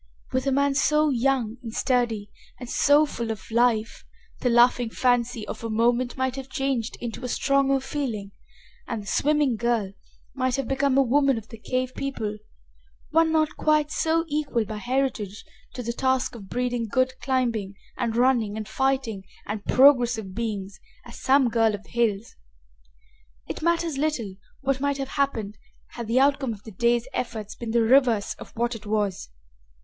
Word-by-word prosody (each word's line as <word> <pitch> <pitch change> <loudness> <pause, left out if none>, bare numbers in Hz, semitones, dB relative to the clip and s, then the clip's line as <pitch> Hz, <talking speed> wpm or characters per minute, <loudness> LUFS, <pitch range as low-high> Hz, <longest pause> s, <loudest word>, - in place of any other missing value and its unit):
With 260 +1 -1
a - - +3
man 280 +1 +2
so 300 +2 +3
young 245 -3 0
and 230 -3 -7
sturdy 230 -4 0 0.3
and 245 - -7
so 290 +4 +4
full 235 -6 -5
of 220 0 -6
life 230 -1 +1 0.4
the 250 - +1
laughing 240 0 +4
fancy 245 -2 0
of - - -7
a 230 - -3
moment 240 +3 +1
might 260 -1 -1
have 270 0 -7
changed 270 -5 -2
into 240 +2 -6
a - - -2
stronger 275 +1 +2
feeling 255 -7 -4 0.6
and 225 -4 -4
the - - -14
swimming 285 +4 +1
girl 225 -4 0 0.4
might 255 -1 0
have 275 -3 -2
become 270 0 +1
a 275 - +6
woman 270 0 +3
of 225 0 -8
the 225 - -10
cave 255 +2 -2
people, 220 -6 -4 0.7
one 325 +1 +4
not 310 -1 +1
quite 305 -1 +2
so 325 +1 +1
equal 285 -7 -1
by 215 +1 -6
heritage 240 -4 -2 0.3
to 250 - -4
the 235 +1 -2
task 260 +1 0
of 200 -5 -11
breeding 245 -2 -1
good 255 +4 +1
climbing 235 -7 -1 0.2
and 235 -2 -2
running 235 -4 +2
and 215 -2 -5
fighting 260 -3 -1 0.2
and 210 0 -4
progressive 245 -7 +4
beings 205 -3 -4 0.3
as - - -11
some 270 -1 +4
girl 225 -2 +2
of 205 - -11
the - - -21
hills. 230 -3 0 1.1
It - - -5
matters 335 -3 0
little 275 -10 -1 0.3
what 270 -1 0
might 285 -1 0
have 270 -1 -4
happened 225 -9 -2 0.3
had 235 -2 -7
the 235 +3 +3
outcome 275 -3 +2
of 205 -1 -13
the 220 - -10
day's 235 +3 +1
effort 220 -4 -4
been 235 - -5
the 230 0 +3
reverse 235 -3 +3
of - - -10
what 240 +1 0
it 215 -2 -9
was. 205 - -1
245 Hz, 175 wpm, -25 LUFS, 225-270 Hz, 1.1 s, a